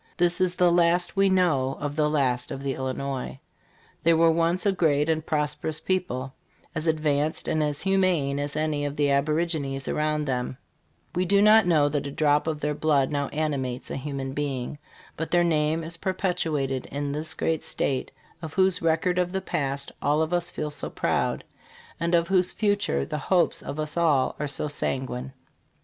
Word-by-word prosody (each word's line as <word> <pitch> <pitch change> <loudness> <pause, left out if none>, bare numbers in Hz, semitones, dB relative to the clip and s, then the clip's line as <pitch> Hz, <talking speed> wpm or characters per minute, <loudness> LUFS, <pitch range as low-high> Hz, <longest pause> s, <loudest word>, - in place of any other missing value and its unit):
This 175 +1 +1
is 180 -1 +2
the 180 -1 +4
last 175 +1 +3
we 195 0 +4
know 155 -8 +2
of 145 0 -3
the 150 -1 +2
last 130 -5 +1
of 135 - -6
the 135 -1 -1
Illinois. 130 0 -4 0.6
They 165 0 +4
were 165 0 +5
once 170 +3 +1
a 200 - +4
great 150 -5 +2
and 160 -1 +1
pros 150 -2 0
perous 155 +1 -4
people, 135 -9 -1 0.4
as 160 0 -3
advanced 155 -1 0
and 155 - +1
as 150 -1 -1
humane 185 -8 +1
as 145 0 -3
any 155 -1 0
of 145 0 -3
the 145 -2 +2
aborigines 140 -1 0
around 150 0 0
them; 125 -1 -2 0.6
we 180 0 +1
do 200 +2 +3
not 215 -1 +6
know 155 -4 +4
that 145 -1 -2
a - - -5
drop 150 +1 +2
of 155 -2 -2
their 150 0 0
blood 145 -3 +2
now 145 -1 -1
animates 140 -5 -3
a - - -3
human 135 -1 -4
being, 140 -1 -3 0.4
but 160 - -4
their 175 0 +3
name 160 -1 +1
is 165 +1 -6
perpetuated 160 -8 -1
in 145 +1 -3
this 155 +2 -2
great 160 -1 -1
state, 130 -2 -1 0.3
of 160 -2 -7
whose 190 -1 +2
record 165 +2 +1
of 180 0 0
the 190 - -1
past 140 -6 -2
all 150 +2 +2
of 160 +2 -3
us 175 0 0
feel 150 -3 -4
so 145 - -5
proud, - - -1 0.6
and 170 +1 +1
of 170 0 +2
whose 185 -2 +2
future 205 - 0
the 150 - -4
hopes 175 +4 +1
of 145 +2 -6
us 155 -1 -2
all 155 -6 +2
are 150 - -1
so 140 +2 -2
sanguine. 130 -3 -3
150 Hz, 190 wpm, -26 LUFS, 140-170 Hz, 0.6 s, not